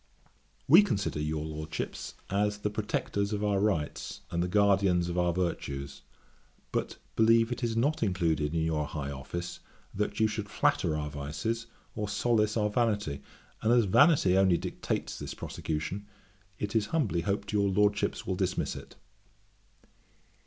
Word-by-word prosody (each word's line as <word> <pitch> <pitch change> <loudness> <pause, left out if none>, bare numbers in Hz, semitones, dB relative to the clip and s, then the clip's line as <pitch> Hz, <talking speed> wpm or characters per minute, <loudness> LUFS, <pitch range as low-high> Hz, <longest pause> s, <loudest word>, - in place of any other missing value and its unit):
'We 165 +8 +9
consider 100 - -1
your 75 0 -2
Lordships 80 0 -5 0.2
as 105 +1 +1
the 105 0 -2
protectors 105 -1 -1
of 105 0 -2
our 100 -2 +2
rights, 95 -8 -1
and 85 0 0
the 90 - 0
guardians 95 -3 +3
of 90 - -3
our 90 -1 +3
virtues; 70 -6 -3 0.7
but - - -2 0.2
believe 115 +1 +4
it 120 +1 -3
not 140 +7 +1
included 85 -6 +1
in 80 - +1
your 75 -2 0
high 70 -2 -4
office, 80 +6 -5 0.3
that 105 +3 -2
you 110 - +5
should 105 -1 -4
flatter 80 -4 +1
our 75 -1 -3
vices, 80 +12 -3 0.3
or 105 -2 -3
solace 105 +1 +1
our 105 -1 +1
vanity: 105 - 0 0.4
and, 110 - +2
as 120 -2 +5
vanity 135 - +5
only 95 -2 +4
dictates - - -3
this - - -6
prosecution, 80 +6 -4 0.5
it 105 +1 -4
is 110 -2 +2
humbly 120 - 0
hoped 100 +3 -2
your 100 -1 +3
Lordships 105 +1 +1
will - - -1
dismiss - - -1
it. - - -10
100 Hz, 150 wpm, -30 LUFS, 80-105 Hz, 0.7 s, We